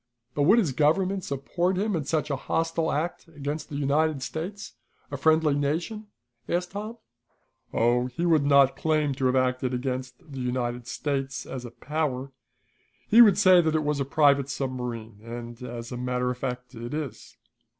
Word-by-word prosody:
"But 145 - +1
would 215 - +7
his 190 - +2
government 185 +7 +2
support 170 +7 -1
him 205 0 0
in 155 -4 -2
such 155 0 -1
a - - +1
hostile 165 +3 -1
act 165 +4 -2
against 150 -1 -5
the 145 - -6
United 145 0 +1
States, 190 +9 -5 0.4
a - - -3
friendly 155 +1 +3
nation?" 165 +10 -2 0.4
asked 180 +1 -1
Tom. 215 +4 -6 0.7
"Oh, 120 +2 +2
he 165 +8 -3
would 160 -4 +4
not 140 -1 +5
claim 155 -3 +1
to 130 -1 0
have 125 - +1
acted 130 0 +1
against 130 0 -3 0.2
the 135 - -6
United 125 -1 -2
States 135 -1 -3
as 130 -2 -6
a - - -6
power. 140 0 -3 0.8
He 230 +3 +8
would 210 -5 +7
say 185 -3 +7
that 160 -1 0
it 155 - +1
was 150 -1 0
a - - +1
private 140 -1 +3
submarine, 125 -5 -4
and, 120 +1 -8
as 120 -1 -7
a 125 - -4
matter 125 0 -1
of 125 - -5
fact, 125 -1 -4
it 120 +3 -6
is. 135 -7 -6
140 Hz, 175 wpm, -26 LUFS, 125-160 Hz, 0.8 s, He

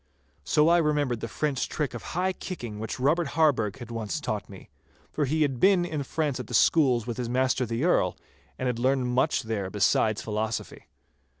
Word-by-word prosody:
So 150 +1 +3
I 170 +1 +5
remembered 145 -7 0
a - - -1
French 145 -4 -2
trick 150 -5 -2
of 120 - -6 0.2
high 185 +1 +1
kicking 120 - -7
which 110 +3 -5
Robert 155 +5 +2
Harburgh 130 -10 +2
had 120 -3 -9
once 110 -5 -3
taught - - -4
me, - - -13 0.4
for 150 - 0
he 155 +3 +1
had 135 -4 -1
been 190 0 +4
in 155 -4 -3
France 145 -1 -2
at 125 - -6
the - - -3
schools 130 -8 +4
with 120 0 -4
his 125 -2 -3
master 130 0 +1
the 115 +4 -2
Earl, 90 - +2 0.4
and 130 - -3
had 125 -2 -1
learned 130 0 +1
much 130 +5 +1
there 105 -4 -3
besides 105 +1 +1
philosophy. 110 +1 -4
130 Hz, 195 wpm, -27 LUFS, 115-150 Hz, 0.4 s, I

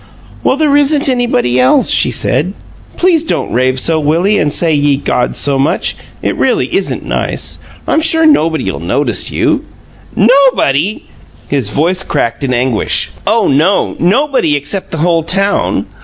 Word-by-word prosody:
"Well, 265 - +1
there 300 -2 +2
isn't 290 0 +3
anybody 130 - 0
else," 125 +1 +3
she - - +3
said. 185 +7 0 0.4
"Please 345 -3 +2
don't 325 - -2
rave 130 +2 +1
so, 160 +3 +2
Willie, 170 +8 +1
and 150 -1 0
say 165 +1 +2
'Ye 145 -1 +1
gods' 125 -3 -2
so 140 -1 +2
much; 140 +4 0 0.3
it - - -1
really - - 0
isn't - - -2
nice. - - -3 0.3
I'm 315 - +1
sure 325 0 +3
nobody 160 - +1
'll - - -7
notice 120 - 0
you - - -1 0.3
" - - -26
"'Nobody'!" 215 - +2 0.5
His 135 -7 -1
voice 170 - -1
cracked 115 -8 -3
in 135 - -1
anguish. 125 -2 0 0.2
"Oh 220 +1 +2
no! 160 +9 +1
Nobody 205 - +1
except 145 +7 -3
the 165 - -4
whole 170 -2 +2
town! 195 +5 0
165 Hz, 155 wpm, -12 LUFS, -, 0.5 s, isn't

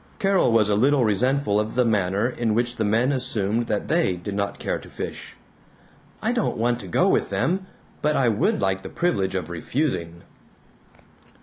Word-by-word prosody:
Carol 195 -9 +2
was 110 -2 +4
a 105 - +1
little 130 +3 +3
resentful 110 +1 +1
of 105 +1 -3
the 125 0 +3
manner 100 -1 +1
in 120 -3 -1
which 120 +1 0
the 110 - 0
men 115 +6 +2
assumed 115 -4 -1
that 105 -2 -2
they 165 - +2
did 95 +3 -6
not 100 0 -2
care - - -2
to - - -13
fish. - - -7 0.9
"I - - +1
don't - - -1
want 120 +2 +1
to 95 - -8
go 85 - +2
with - - +2
them, 185 +2 -1 0.3
but 150 0 +1
I 130 - +2
would 110 -3 +1
like 95 -1 0
the - - -8
privilege 100 - -1
of 90 -3 -3
refusing." 85 - -2
110 Hz, 185 wpm, -24 LUFS, 100-130 Hz, 0.9 s, was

